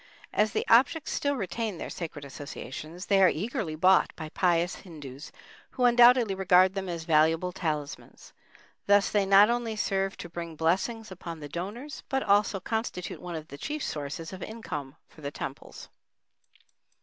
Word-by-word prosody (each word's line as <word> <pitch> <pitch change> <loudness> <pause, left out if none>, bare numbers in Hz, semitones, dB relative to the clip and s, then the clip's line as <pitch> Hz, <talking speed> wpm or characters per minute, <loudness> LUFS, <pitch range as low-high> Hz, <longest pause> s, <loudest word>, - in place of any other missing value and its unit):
As 215 0 +2
the - - -1
objects 260 +7 +4
still 285 0 0
retain 210 -2 -3
their - - -6
sacred 150 -4 -6
associations, 150 +5 -8
they 195 -1 +3
are 185 - +7
eagerly 205 - -3
bought 185 +4 +4
by 155 - -7
pious 175 +1 +1
Hindus, 150 -5 -10 0.4
who 250 - 0
undoubtedly 240 -2 +6
regard 185 0 +4
them 195 -2 -4
as 170 -2 -4
valuable 160 +2 +3
talismans. 150 -5 -5 0.5
Thus 205 0 +4
they 200 -2 +2
not 200 +3 +7
only 240 -2 -1
serve 195 -2 -1
to - - -7
bring 170 -1 -7
blessings 195 +8 0
upon 170 -3 -7
the 145 - -7
donors, 205 - -6
but 270 0 0
also 205 -1 +3
constitute 220 -4 -4
one 175 -1 -6
of 160 0 -7
the 140 - -10
chief 300 0 -4
sources 150 +4 -5
of 190 - -8
income 155 -12 -6
for 155 - -18
the 140 - -3
temples. 140 -1 -8
185 Hz, 160 wpm, -28 LUFS, 160-215 Hz, 0.5 s, are